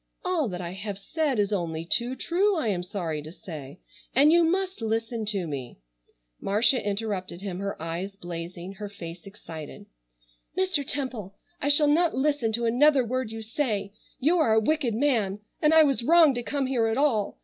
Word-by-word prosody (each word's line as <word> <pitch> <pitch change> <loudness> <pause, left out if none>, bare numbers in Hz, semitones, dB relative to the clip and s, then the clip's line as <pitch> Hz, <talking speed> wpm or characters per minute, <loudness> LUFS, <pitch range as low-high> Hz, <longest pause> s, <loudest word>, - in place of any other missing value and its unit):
"All 355 -7 +1
that 180 -3 -5
I 170 -1 -5
have 200 +1 -5
said 290 +6 -1
is 205 0 +1
only 165 -4 -2
too 240 +8 0
true, 375 +8 +1
I 240 -8 0
am 185 -3 0
sorry 175 -4 -3
to 155 +2 -9
say, 155 -4 -9 0.4
and 285 +4 +6
you 340 +1 +5
must 375 0 0
listen 225 0 -1
to 200 -4 0
me——" 135 -6 -6 0.6
Marcia 225 +6 +2
interrupted 200 -3 -3
him, 190 -3 -4
her 200 0 -4
eyes 170 +5 -4
blazing, 175 0 -7
her 205 +1 -7
face 170 -2 -9
excited: 165 -7 -9 0.7
"Mr. 375 -6 +1
Temple, 250 -9 -4 0.3
I 285 - 0
shall 290 +1 +6
not 325 +3 +3
listen 265 -4 +1
to 235 +1 0
another 265 +3 +4
word 255 0 -2
you 225 0 -6
say. 220 -4 -2 0.3
You 320 +6 +3
are 225 -8 +4
a - - +6
wicked 255 -1 0
man 225 -7 +1 0.2
and 300 - +4
I 320 0 +8
was 275 -4 +2
wrong 320 +2 +6
to 245 - -3
come 280 +3 -1
here 250 -4 +1
at 225 +1 0
all. 245 -8 +1
225 Hz, 185 wpm, -26 LUFS, 190-285 Hz, 0.7 s, I